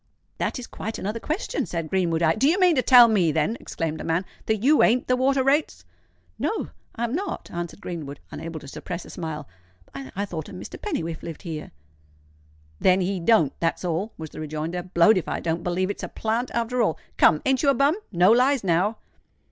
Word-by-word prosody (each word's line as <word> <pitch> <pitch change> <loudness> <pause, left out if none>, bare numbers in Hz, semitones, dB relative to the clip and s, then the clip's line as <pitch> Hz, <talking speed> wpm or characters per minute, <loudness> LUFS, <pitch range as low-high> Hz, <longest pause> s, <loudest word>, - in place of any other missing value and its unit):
"That - - -1
is 250 - -6
quite 220 -2 -6
another 210 +4 -3
question," 330 - -2
said 165 -2 -3
Greenwood. 170 -2 0
"I——" 160 0 +4
"Do 265 - +2
you 360 +5 +2
mean 360 -3 +5
to 255 - +3
tell 250 -2 +8
me, 190 -8 +3
then," 160 +8 0
exclaimed 160 -2 -4
the - - -5
man, 165 +3 0 0.2
"that 220 - +3
you 295 +4 +5
ain't 245 +3 +4
the 255 - +3
Water 265 +1 +2
Rates?" 285 +3 +1 0.5
"No—I 250 - -4
am 235 0 -1
not," 370 +4 -4
answered 175 +3 -5
Greenwood, 150 -5 -6
unable 165 -1 -6
to - - -11
suppress 175 +5 -6
a - - -11
smile. 155 -4 -5 0.5
"I 140 +9 -5
thought 165 -5 -5
that - - -10
a - - -7
Mr. - - -9
Pennywhiffe 165 - -3
lived 165 +2 -8
here." 160 -4 -6 1.1
"Then 185 0 +4
he 185 +1 -1
don't—that's 165 -3 +2
all," 180 +6 -1
was 160 -1 -7
the - - -9
rejoinder. 155 +3 -3
"Blowed 180 +3 +4
if - - -8
I - - -2
don't 165 0 -2
believe 185 +2 0
it's - - -7
a - - -4
plant, 225 +3 -2
after 235 +1 0
all. 205 -8 +1 0.2
Come—ain't 260 - +4
you 285 - +3
a 275 - +4
bum? 280 +6 +3 0.2
no 180 +1 +5
lies, 255 +2 +3
now!" 190 +5 +1
185 Hz, 205 wpm, -24 LUFS, 165-245 Hz, 1.1 s, tell